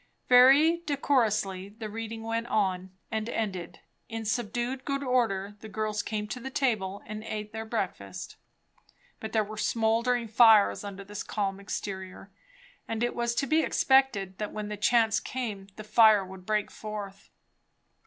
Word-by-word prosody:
Very 270 +7 +7
decorously 215 -9 +1
the 215 +1 -7
reading 225 +1 -6
went 230 +1 -2
on 190 -4 0 0.2
and 220 0 -2
ended; 190 -7 -4 0.3
in 225 -1 -5
subdued 240 +3 -2
good 275 0 -2
order 215 -6 0
the 220 - -10
girls 215 0 -2
came 210 0 -3
to 250 - -4
the 265 +2 -6
table 210 -8 -1
and 215 0 -7
eat 210 -1 -5
their 220 0 -5
breakfast; 180 - -4 0.8
but 220 - -6
there 220 -1 +2
were 215 +1 -8
smouldering 230 +2 +1
fires 220 -2 +5
under 200 -1 -7
this 205 +1 -7
calm 195 -2 -2
exterior; 195 -1 -6 0.6
and 225 +1 -2
it 240 - -1
was 235 0 -1
to 275 - +1
be 310 +3 +3
expected 265 - +2
that 210 -1 -3
when 210 -1 -5
the 210 - -3
chance 225 +2 +3
came 220 -8 -5
the 215 - -8
fire 215 -2 +5
would 185 -1 -12
break 210 -1 0
forth. 205 -2 -7
215 Hz, 155 wpm, -28 LUFS, 200-235 Hz, 0.8 s, Very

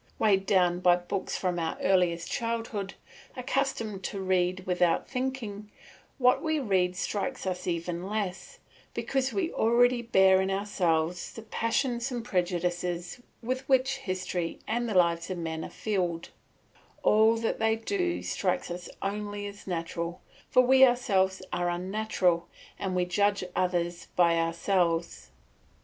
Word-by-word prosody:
Weighed 195 -3 +2
down 180 -2 +3
by 180 -1 +5
books 180 +2 -3
from 180 -2 -1
our 165 -1 -2
earliest 180 -3 +1
childhood, 230 -4 -3 0.4
accustomed 250 -6 -2
to 200 - -3
read 185 -1 0
without 180 -2 +1
thinking, 250 -6 -4 0.5
what 255 0 +4
we 315 -1 0
read 190 -9 +1
strikes 200 +2 -3
us 185 -1 -3
even 175 +1 -3
less, 205 -3 -4 0.4
because 270 -1 0
we 355 -4 -1
already 240 +2 +3
bear 190 -5 +5
in 190 - -1
ourselves 180 -4 0
the 225 - -9
passions 235 +2 -1
and 240 -2 -4
prejudices 180 0 -2 0.2
with 255 +2 -1
which 265 0 +3
history 180 -2 -3
and 235 +1 -1
the 210 - -2
lives 170 -1 +3
of 185 - -3
men 160 -1 -4
are - - -6
filled; 180 -6 -2 0.7
all 220 +2 +5
that 225 0 -1
they 220 0 +3
do 350 - -2
strikes 265 -9 -1
us 175 0 -6
as - - -13
only 205 0 -3
natural, 170 -1 -4 0.3
for 255 - +5
we 265 +1 +6
ourselves 200 -8 +3
are 175 0 0
unnatural 180 -1 0 0.3
and 190 -2 -2
we 180 0 +2
judge 200 +3 +1
others 175 -1 -1
by 170 -1 +4
ourselves. 165 - 0
190 Hz, 140 wpm, -28 LUFS, 175-230 Hz, 0.7 s, we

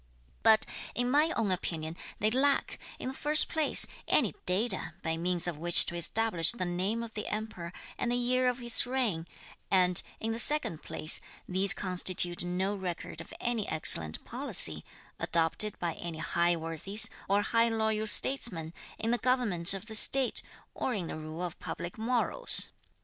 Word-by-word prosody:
But 220 0 +4 0.3
in 245 +1 -1
my 300 +4 +2
own 215 -4 -1
opinion, 165 -3 -4 0.2
they 215 +1 0
lack, 275 +3 0 0.2
in - - -6
the - - -7
first 300 +3 +4
place, 315 -2 +5 0.2
any - - +2
data 185 -3 -1
by 160 0 -2
means 175 +1 -3
of 170 -4 -5
which 175 +1 +5
to 175 - -6
establish 175 +1 +3
the 210 -6 -5
name 190 +6 -3
of 225 -1 -10
the 210 - -6
Emperor 210 -6 -6 0.3
and 240 - -2
the - - +1
year 250 +1 +1
of 250 -1 -1
his 240 -1 +4
reign; 230 -11 -2 0.4
and, 180 -2 +3 0.2
in 225 - -3
the 225 - -4
second 255 - -1
place, 155 - +2 0.3
these 190 +2 +6
constitute 180 -2 0
no 185 +3 -2
record 180 -4 -7
of - - -14
any 235 -3 -3
excellent 80 - +1
policy, - - +1 0.4
adopted 170 +5 0
by 170 -2 -4
any 170 0 -8
high 170 +1 0
worthies 165 +6 -1 0.2
or 200 +1 +1
high 230 +2 +1
loyal 220 -1 -2
statesmen, 200 -10 0 0.2
in 225 +1 -3
the 240 - 0
government 220 -9 +2
of 195 +2 -9
the 225 - -10
state, 260 +4 +5 0.3
or 255 - -3
in 190 -4 -4
the - - -7
rule 155 +2 -8
of 175 -1 -7
public 175 +5 -8
morals. 250 - +2
200 Hz, 170 wpm, -29 LUFS, 170-235 Hz, 0.4 s, these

